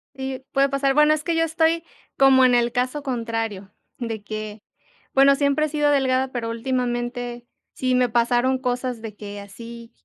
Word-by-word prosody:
Sí, 265 -1 -5
puede 275 0 +3
pasar, 275 0 +1
bueno, 300 +1 +5
es 305 -1 -2
que 335 0 -1
yo 330 - +2
estoy 325 +1 +1 0.3
como 265 -1 +6
en 250 -1 +4
el 240 0 +2
caso 255 +4 -2
contrario, 225 -6 -3 0.3
de 225 -3 -4
que, 215 0 -6 0.5
bueno, 275 +1 +6
siempre 285 +2 +1
he - - -4
sido 295 0 +1
delgada, 265 -1 +1
pero 230 -2 -3
últimamente 240 0 -3 0.3
sí 255 -1 -1
me 250 -1 +3
pasaron 240 +2 +2
cosas 250 -2 -3
de 220 -2 -8
que 205 -1 -8
así 230 +3 -11
250 Hz, 175 wpm, -23 LUFS, 230-275 Hz, 0.5 s, como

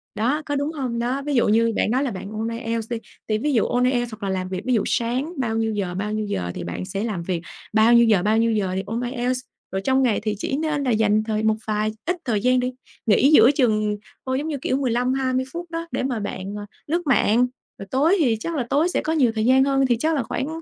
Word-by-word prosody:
đó 255 +8 0
có 290 - -2
đúng 285 +2 -1
hông? 250 -5 -3
Đó 250 +4 -1
ví 290 -2 -1
dụ 240 - +3
như 225 +1 +3
bạn - - +1
nói 260 +3 +2
là 270 - -1
bạn 195 +1 -7
ôn 220 +1 -3
IELTS 230 -1 -3
đi, 235 - 0 0.3
thì 215 -1 +1
ví 290 +6 -1
dụ 230 - +3
ôn 245 0 +1
IELTS 245 -2 +1
hoặc 215 -1 -9
là - - -1
làm 185 -1 -2
việc 185 0 -3
ví 255 - +1
dụ 215 - +2
sáng 250 +8 -1
bao 225 -4 -1
nhiêu 225 -1 0
giờ, 190 -4 -2
bao 205 +3 -2
nhiêu 215 0 -1
giờ 90 - -3
thì - - -5
bạn 85 - -5
sẽ 195 +2 -3
làm 205 -7 -3
việc, 175 -2 -2 0.3
bao 220 +2 +5
nhiêu 235 0 +7
giờ, 205 -5 +3
bao 215 +1 +2
nhiêu 230 0 +3
giờ 205 -4 0
thì 190 - -1
ôn 225 +3 -3
IELTS 250 0 -1 0.3
rồi 190 - -2
trong 265 +5 +2
ngày 235 -5 +2
thì 215 -1 -1
chỉ 270 - -2
nên 300 -2 -1
là 255 - +1
dành 215 -1 +3
thời 215 -1 -2
một 220 0 +3
vài 215 0 0
ít 355 +2 0
thời 215 -5 0
gian 255 +2 +3
để 250 0 -1 0.3
nghỉ 245 +6 +4
giữa 245 -4 +8
chừng 215 -6 +1 0.3
thôi, 260 0 0
giống 300 - -3
như 305 -3 -2
kiểu, 285 -5 0
15-20 255 0 0
phút 345 0 -6
đó 330 0 -4
để - - -1
mà 255 -4 -1
bạn, 200 -1 -5
ờ, 205 - -6 0.2
lướt 340 +4 0
mạng, 245 -1 +3 0.3
rồi 195 - -8
tối 305 +8 +3
thì 245 -8 +3
chắc 335 +8 -4
là 255 -5 -2
tối 310 +5 +2
sẽ - - 0
có 315 - -1
nhiều 265 -7 +3
thời 220 - 0
gian 260 +2 +5
hơn 270 -1 +2
thì 240 -2 +2
chắc 320 +1 +1
là 275 - 0
khoảng 265 - -3
235 Hz, 275 wpm, -23 LUFS, 215-265 Hz, 0.3 s, giữa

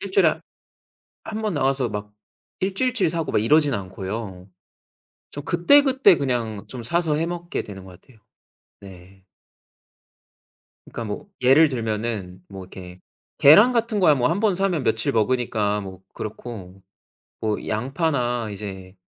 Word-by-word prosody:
1 200 - -6
주일에 - - +3 0.8
1 220 0 -5
번 215 -4 -1
나와서 135 -3 0
막 105 0 -6 0.5
1 190 +1 -1
주일치 255 +3 +1
사고 165 -3 -3
막 - - +2
이러진 145 +2 +3
않고요. 95 0 -6 0.8
좀 145 - -8
그때그때 265 - +4
그냥 120 -7 -2
좀 125 -2 -7
사서 160 +5 0
해 160 +2 -1
먹게 175 0 -4
되는 95 -2 -10
것 90 -1 -14
같아요. 120 -4 -22 0.6
네. 95 0 -15 1.6
그니까 115 - -6
뭐 105 -2 -6 0.2
예를 140 +5 +6
들면은 110 -6 -4
뭐 95 -1 -9
이렇게 90 -1 -12 0.4
계란 205 - +7
같은 230 -3 0
거야 155 -5 +5
뭐 125 -2 +1
1 180 +8 -1
번 215 -4 +2
사면 185 -5 0
며칠 110 -2 0
먹으니까 110 -3 0
뭐 95 -2 -9
그렇고 100 -4 -8 0.6
뭐 110 -1 -2
양파나 120 -1 -1
이제 95 -2 -8
120 Hz, 250 characters per minute, -23 LUFS, 100-165 Hz, 1.6 s, 계란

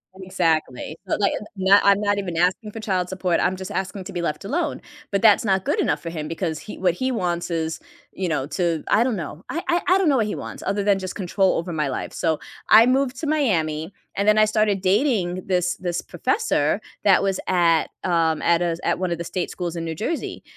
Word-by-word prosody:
Exactly, 165 -6 -1
so, - - +1
like, 200 -1 +2
i - - -2 0.2
not 195 +1 +5
I'm 200 0 +5
not 205 -1 +1
even 180 -4 -3
asking 185 +5 +1
for 225 - -7
child 185 -4 -1
support, 185 -2 0
I'm 185 +1 +1
just 190 0 -7
asking 190 0 -3
to 195 - -8
be 175 - -2
left 150 +2 -2
alone, 305 - -2 0.3
but 200 +1 0
that's 220 0 +5
not 190 -1 +1
good - - 0
enough 145 0 0
for 165 - -5
him 155 -2 -5
because 165 -1 -3
he 210 - -9
what 180 -2 +2
he 260 +4 -1
wants 175 -7 -2
is, 160 -1 -2 0.3
you 185 -1 -3
know, 150 -5 -1
to 165 +1 -1
I 225 - +4
don't 250 -3 0
know, 165 -1 -6
I 335 - -2
I 345 +1 +2
I 370 - +5
don't 350 -6 +3
know 270 - +3
what 220 - +2
he 210 - -3
wants - - -7
other 200 +1 0
than 200 -1 +3
just 185 -1 -5
control 190 0 +1
over 170 +2 -3
my 150 -3 -1
life 130 - -4
so 160 -2 -1 0.3
I 225 +2 +8
moved 260 0 +1
to 310 - -2
Miami, 170 - 0 0.2
and 200 +1 0
then 210 0 +5
I 215 - +6
started 215 -3 +1
dating 190 -3 +1
this 180 -1 0
this 175 -1 -3
professor 450 0 0 0.2
that - - +5
was 195 -1 0
at, 170 -3 +3
um, 165 -3 +1
at 170 0 +3
a 170 -1 -1
at - - +1
one 185 -1 -1
of 170 - -1
the 170 - -2
state 180 +1 -3
schools 175 -2 -4
in 165 -1 -4
New 160 -1 -4
Jersey, 315 - -4
185 Hz, 235 wpm, -23 LUFS, 170-210 Hz, 0.3 s, I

